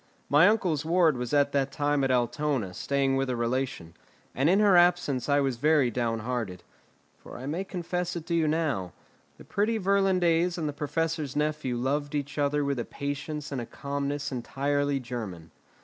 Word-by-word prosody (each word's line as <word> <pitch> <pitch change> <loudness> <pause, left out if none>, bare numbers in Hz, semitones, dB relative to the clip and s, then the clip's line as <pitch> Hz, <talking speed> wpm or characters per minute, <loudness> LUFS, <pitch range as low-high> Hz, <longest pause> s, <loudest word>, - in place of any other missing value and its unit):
My 150 +5 +6
uncle's 180 -9 +1
ward 165 -2 +3
was 125 -1 -4
at 145 -1 +3
that 140 -1 0
time 145 0 0
at 135 - +1
Altona, 125 -4 0
staying 135 +6 0
with 135 -1 0
a 125 - 0
relation, 120 -7 -2 0.4
and 135 +5 +2
in 190 +3 +4
her 205 -3 +5
absence 175 -7 +3
I 145 0 +4
was 135 -3 -1
very 145 -2 +3
downhearted; 115 -4 -2 0.6
for - - -11
I 125 - -7
may 160 +7 -2
confess 180 -1 -3
it 165 -2 -5
to 170 - -3
you 165 -2 +2
now, 150 - -1 0.4
the - - -14
pretty 210 +9 0
Virlandaise 180 -3 +2
and 160 -3 -2
the 145 - -3
professor's 155 0 -2
nephew 150 -4 -1
loved 145 +4 -1
each 145 +1 -3
other 145 0 +1
with 140 -2 -1
a 120 - -2
patience 145 +1 -5
and 135 -3 -2
a - - -5
calmness 140 +1 -3
entirely 140 +3 -1
German. 110 -10 -7
145 Hz, 180 wpm, -28 LUFS, 130-160 Hz, 0.6 s, My